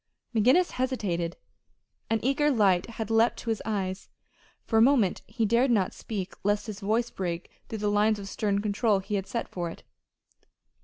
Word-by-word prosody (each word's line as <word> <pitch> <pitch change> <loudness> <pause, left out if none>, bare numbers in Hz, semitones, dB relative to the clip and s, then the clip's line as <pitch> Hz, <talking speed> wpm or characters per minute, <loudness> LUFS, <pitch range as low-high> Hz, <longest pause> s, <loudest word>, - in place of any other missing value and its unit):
McGinnis 255 - +4
hesitated. 200 -10 -2 0.7
An 225 - +2
eager 275 +4 +2
light 195 -9 +3
had 220 -1 -3
leaped 225 +1 +3
to 230 - -3
his 220 - -2
eyes. 195 -3 -3 0.6
For 225 - +1
a - - +6
moment 235 -7 +4
he 230 -3 -1
dared 235 +5 +3
not 205 -6 +2
speak 195 -4 -5
lest 205 +1 +1
his 210 -3 -6
voice 220 +4 0
break 175 -2 -4 0.2
through 220 - -4
the 210 0 -1
lines 210 +1 +3
of 200 -1 -7
stern 200 0 -1
control 210 0 +2
he 195 +2 -5
had 195 -1 -1
set 235 - -3
for 175 -2 -4
it. - - -11
210 Hz, 175 wpm, -28 LUFS, 195-235 Hz, 0.7 s, a